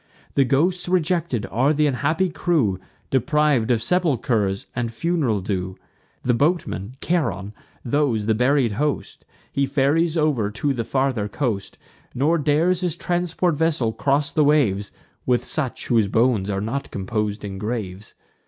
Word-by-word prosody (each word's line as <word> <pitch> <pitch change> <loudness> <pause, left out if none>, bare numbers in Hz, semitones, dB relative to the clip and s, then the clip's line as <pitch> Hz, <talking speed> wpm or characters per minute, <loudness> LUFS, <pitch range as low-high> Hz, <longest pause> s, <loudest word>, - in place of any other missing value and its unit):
The 135 - +3
ghosts 175 +7 +1
rejected 170 - 0
are 135 +6 +2
th' 150 - 0
unhappy 150 +5 +1
crew 140 - +1 0.3
Depriv'd 135 -2 +2
of 115 -3 +2
sepulchers 120 - +1
and 120 -1 -1
fun'ral 125 - 0
due: 95 -1 -3 0.5
The 125 - +2
boatman, 130 - 0
Charon; 105 - -1 0.3
those, 120 -5 +1
the 110 - +2
buried 125 +1 +2
host, 145 +7 -3 0.3
He 140 0 0
ferries 155 +5 +2
over 145 -10 +1
to 135 +7 -1
the 115 -3 -3
farther 130 -6 0
coast; 105 -3 -3 0.4
Nor 155 +6 +2
dares 160 +5 +2
his 175 -4 -1
transport 175 0 0
vessel 150 -7 0
cross 140 +3 0
the 155 - +3
waves 115 -10 +2 0.4
With 125 -1 +2
such 140 -6 -3
whose 115 -4 +2
bones 110 -2 +2
are 100 -1 -1
not 115 +7 -3
compos'd 105 +1 -3
in 95 -1 -6
graves. 105 -3 -5
130 Hz, 145 wpm, -22 LUFS, 110-155 Hz, 0.5 s, The